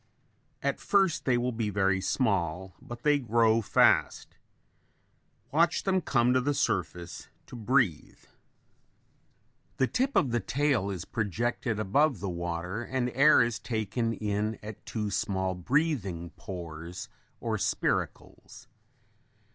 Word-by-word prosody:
At - - 0
first 195 -5 +2
they 125 -3 +3
will 125 +1 0
be 115 -2 -2
very 95 -1 +1
small 95 - -1
but 120 0 -9
they 150 -1 +4
grow 115 -2 +3
fast. 105 - +2 1.2
Watch 170 +3 +2
them 190 -1 +1
come 125 -5 +2
to 130 - +3
the 145 +3 0
surface 90 -5 -2 0.2
to - - -11
breathe. 120 - 0 1.6
The 130 - +3
tip 265 - -1
of 130 - +3
the 120 - +1
tail 130 -2 0
is 95 -3 -5
projected 110 +1 -2
above 125 - +2
the 95 0 -3
water 85 +4 -4
and 125 0 -2
air 140 0 +6
is 120 -1 -2
taken 115 +1 -2
in 105 0 -2
at 105 -1 -9
two 105 -3 -3
small 95 -1 -1
breathing 95 - -1
pores 85 0 -8 0.3
or - - -2
spiracles. - - -3
110 Hz, 125 wpm, -29 LUFS, 95-130 Hz, 1.6 s, air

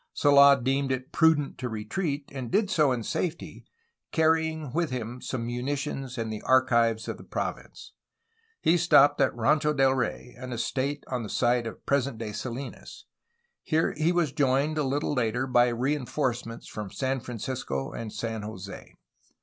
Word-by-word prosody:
Sold 140 -2 +6
deemed 135 +1 +1
it 130 0 -3
prudent 160 -4 +2
to 125 -1 -3
retreat, 140 - -3
and 130 -4 -5
did 200 - +1
so 150 -4 +3
in 120 -3 -1
safety, 170 +8 -3 0.5
carrying 160 -3 +1
with 170 0 0
him 125 0 -5
some 115 -3 -3
munitions 135 +1 -3
and 115 -1 -3
the 105 - -6
archives 120 -4 +3
of - - -4
the - - -12
province. - - -5 0.7
He 170 - +4
stopped 145 -4 +5
at 135 - +4
Rancho 150 +6 +2
del 135 -2 +3
Rey, 125 -1 -3
an 130 -1 -6
estate 135 +4 -2
on 125 -2 -3
the 110 - -6
site 120 0 +1
of 115 - -9
present 140 -3 0
day 110 -2 -5
Salinas. 130 +5 -7 0.6
Here 160 0 +1
he 155 +3 +2
was 175 -5 +1
joined, 140 +3 +1
a - - +2
little 140 +2 -1
later, 120 -1 0
by 120 -1 +4
reinforce 125 0 -1
ments 115 0 -9
from 105 -2 -6
San 130 +5 -2
Francisco 120 - -4
and 115 -2 -6
San 115 -1 -4
Jose. 100 -2 -9
130 Hz, 165 wpm, -27 LUFS, 120-145 Hz, 0.7 s, Sold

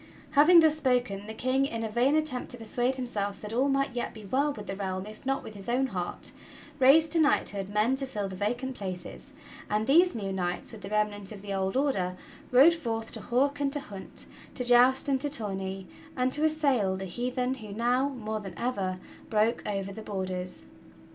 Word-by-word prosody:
Having 320 +4 +7
thus 310 -1 +4
spoken 245 -8 0
the 220 - -5
King, 255 +3 +1
in 230 -4 -4
a 220 - -3
vain 250 +6 +3
attempt 305 -5 -1
to 245 - -1
persuade 245 +3 -1
himself 205 -6 -3
that 210 +1 -7
all 260 +4 +2
might 275 -2 0
yet 240 - -3
be 215 -2 -10
well 275 +8 +1
with 210 -6 -8
the 195 - -4
realm 190 -1 -3
if 215 0 -11
not 270 0 0
with - - -9
his 200 +1 -8
own 255 +3 +2
heart, 180 -8 -4 0.5
raised 300 +5 +6
to 330 - +2
knighthood 200 -10 +1
men 210 +5 +2
to 270 0 -1
fill 210 -6 -3
the 190 - -7
vacant 240 +7 -2
places, 190 +5 -7 0.4
and 210 +1 +1
these 340 +6 +5
new 200 -3 -3
knights 180 -2 -3
with 220 -3 -10
the 195 - -7
remnant 210 -1 -1
of 205 -2 -9
the 200 -1 -4
old 190 +4 -1
Order 190 -11 0 0.3
rode 275 +7 +7
forth 225 -8 -4
to - - -7
hawk 275 +4 +1
and 280 -1 0
to 290 - +1
hunt, 200 -8 -9 0.3
to 250 - -2
joust 245 +2 +5
and 270 -2 +1
to 290 - -1
tourney, 195 -6 -4 0.3
and 255 0 +1
to 295 +3 +1
assail 280 -11 +2
the 190 - -5
heathen 250 +6 -2
who 220 -6 -9
now, 245 +6 +1
more 220 -5 -4
than 195 -5 -9
ever, 195 -6 -2 0.3
broke 220 +2 +2
over 195 -1 -3
the 220 - -8
borders. 185 -3 -4
230 Hz, 205 wpm, -28 LUFS, 200-265 Hz, 0.5 s, Having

